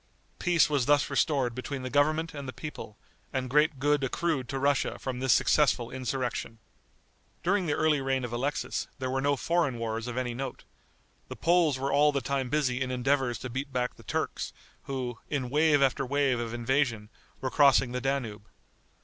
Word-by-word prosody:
Peace 175 -2 +4
was 140 -5 0
thus 145 0 +3
restored 135 -6 +1
between 130 +2 -5
the 130 - -3
government 155 +3 +2
and 140 -2 -6
the - - -4
people, 130 -8 -8 0.3
and 130 -2 -3
great 150 +1 +3
good 145 +1 +2
accrued 135 -1 -1
to 135 - -2
Russia 140 +1 +1
from 130 -2 -4
this 130 0 +2
successful 125 -3 +3
insurrection. 125 -2 -3 0.9
During 185 0 +1
the 145 - +1
early 155 -3 +2
reign 135 -1 0
of 120 - -6
Alexis, 135 +5 -2
there 130 -1 -3
were 135 0 0
no 140 +1 +2
foreign 165 -3 0
wars 115 0 -3
of 120 0 -5
any 125 -2 -1
note. 130 +1 -5 0.6
The - - -7
Poles 170 -5 +3
were 135 +1 -1
all 150 +1 +5
the 140 - 0
time 135 -2 -2
busy 130 -3 0
in 130 - -1
endeavors 130 0 +1
to 130 - -5
beat 135 +3 -4
back 125 -1 -1
the - - -16
Turks, - - -3 0.3
who, 125 -4 -4
in 130 -4 -2
wave 150 -1 +4
after 135 +1 +2
wave 135 -2 +1
of 115 -1 -3
invasion, 120 -2 0 0.3
were 130 - -3
crossing 135 -3 +5
the 125 0 -3
Danube. 115 -6 -3
135 Hz, 185 wpm, -29 LUFS, 125-145 Hz, 0.9 s, all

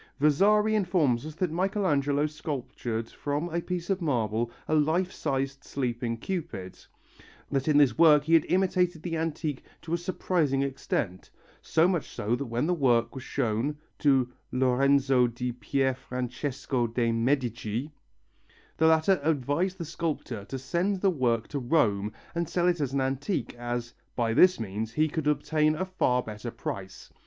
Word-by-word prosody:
Vasari 205 +9 +4
informs 170 - +1
us 155 - -8
that 180 -1 -1
Michelangelo 155 -6 +1
sculptured 130 -7 -4
from 145 +4 -3
a 170 +1 -1
piece 175 -1 -4
of 195 -1 0
marble 115 - 0 0.2
a - - 0
life 160 +5 +2
sized 135 -1 -2
sleeping 120 -3 -2
Cupid, 150 - -5 0.7
that 135 0 0
in 150 -2 +4
this 145 -2 +4
work 150 -3 +7
he 160 +2 0
had 165 -2 +6
imitated 180 -3 +1
the 170 -2 -2
antique 160 -3 -2 0.2
to 165 - -4
a 170 - +1
surprising 170 -6 0
extent; 130 -8 -3 0.3
so 160 +2 +3
much 180 -5 -1
so 110 +4 -1
that 135 +2 -4
when 115 +4 -1
the 180 - +2
work 125 -7 +2
was 130 -2 -7
shown 130 +3 -1 0.2
to 130 -4 +3 0.2
Lorenzo 130 0 +3
di 120 +1 -3
Pierfrancesco 125 +1 -2
de' 115 -1 +1
Medici 120 +1 -1 0.9
the 160 - +4
latter 160 +4 +4
advised 160 +5 0
the 170 - -5
sculptor 150 -9 -4
to 135 - -5
send 180 +9 -1
the 195 - +4
work 120 -7 0
to 145 - -3
Rome 110 -7 +1 0.2
and 170 -1 -2
sell 175 -1 +1
it 175 -3 +1
as 135 -3 -1
an 140 - +1
antique, 135 +7 -2
as 120 0 -4 0.2
"by 115 -2 +1
this 180 +6 +6
means 110 +1 -4
he 155 +5 +2
could 155 0 -3
obtain 150 +1 +2
a 185 +4 -2
far 125 -9 +1
better 105 +2 -6
price." 95 -4 -7
140 Hz, 160 wpm, -28 LUFS, 120-165 Hz, 0.9 s, work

